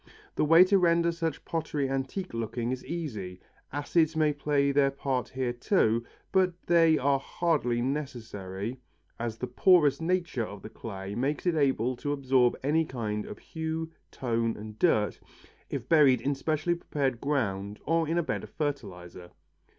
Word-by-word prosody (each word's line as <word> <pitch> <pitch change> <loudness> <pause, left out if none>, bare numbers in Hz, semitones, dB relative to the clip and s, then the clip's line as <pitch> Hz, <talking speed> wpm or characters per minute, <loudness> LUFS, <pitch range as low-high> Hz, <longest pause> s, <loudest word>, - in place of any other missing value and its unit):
The - - 0
way 165 +4 +8
to 195 +1 +4
render 170 -1 +3
such 165 -2 -3
pottery 155 -4 -2
antique 135 +7 -3
looking 115 +1 -2
is 130 0 -4
easy. 110 - -5 0.3
Acids 155 +3 +1
may 155 -1 +3
play 140 -1 +1
their 140 0 +4
part 135 -2 -2
here 130 -2 -2
too, 120 - +2 0.3
but 185 -2 +3
they 165 -2 +5
are 140 0 +2
hardly 135 -7 0
necessary 120 -6 -4 0.4
as 115 -1 -3
the 125 - -3
porous 150 +4 +4
nature 170 -7 0
of 100 -2 -8
the 110 - -8
clay 100 -3 -7
makes 135 - -1
it 175 - +3
able 130 -5 +1
to 145 +3 -2
absorb 130 -3 +2
any 155 +4 +2
kind 110 -7 -4
of - - -8
hue, 160 0 -4 0.2
tone 115 -2 -1
and 105 0 -9
dirt 110 - +2 0.5
if - - -4
buried 145 -6 +5
in 140 - 0
specially 155 +4 0
prepared 140 -7 -2
ground 105 -8 -1
or 165 +1 +1
in 165 +2 0
a 170 - +2
bed - - -3
of - - -9
fertilizer. 95 - -5
140 Hz, 160 wpm, -28 LUFS, 115-160 Hz, 0.5 s, way